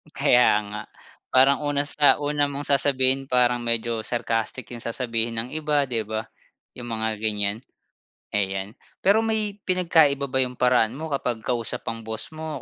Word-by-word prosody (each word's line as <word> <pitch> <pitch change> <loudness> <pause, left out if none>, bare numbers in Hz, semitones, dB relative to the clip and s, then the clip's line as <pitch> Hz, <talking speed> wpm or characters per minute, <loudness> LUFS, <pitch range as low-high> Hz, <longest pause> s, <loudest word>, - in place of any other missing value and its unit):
Kaya 125 0 +4 0.2
nga, 105 +1 -6 0.5
parang 135 +2 +4
una 145 -1 0
sa 145 0 +4
una 145 0 0
mong 140 +1 -4
sasabihin 135 -1 +2
parang 125 -1 +2
medyo 115 -1 -1
sarcastic 115 +1 -2
'yong 120 -1 -7
sasabihin 115 -1 -1
ng 115 +2 -3
iba, 150 -2 0
'di 120 -4 -1
ba? 110 0 -3 0.5
'Yong 120 -1 -8
mga 110 -1 -1
ganyan. 105 -1 0 0.7
Ayan, 95 0 -3 0.2
pero 215 +4 +3
may 215 -2 -1
pinagkaiba 160 -6 +3
ba 130 - -1
'yong 130 -1 +1
paraan 125 -3 +3
mo 160 +4 -6
kapag 125 -5 -2
kausap 120 -1 -1
ang 115 0 -6
boss 110 0 -4
mo 155 -3 -6
125 Hz, 155 wpm, -24 LUFS, 115-145 Hz, 0.7 s, Kaya